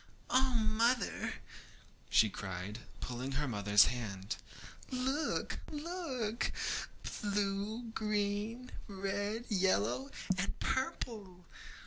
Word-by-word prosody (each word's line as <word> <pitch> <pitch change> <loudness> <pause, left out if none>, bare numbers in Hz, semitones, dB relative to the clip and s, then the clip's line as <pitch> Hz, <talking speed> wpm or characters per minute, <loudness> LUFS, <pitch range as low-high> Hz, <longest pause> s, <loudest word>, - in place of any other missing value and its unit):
'Oh, 260 -1 +4
mother, 225 +1 +2
oh!' 110 - -1
cried 95 +2 -4
she, - - -17
pulling 125 +2 -3
her 145 +2 +1
mother's 105 -3 +6
hand, 105 -4 -2 0.5
'look, 265 +4 0
look! 295 -8 -1 0.7
blue, 205 +2 0
green, 210 +3 0 0.2
red, 205 +3 -2
yellow, 135 - +2 0.3
and 195 - -1
purple! 215 -8 -2
205 Hz, 85 wpm, -35 LUFS, -, 0.7 s, mother's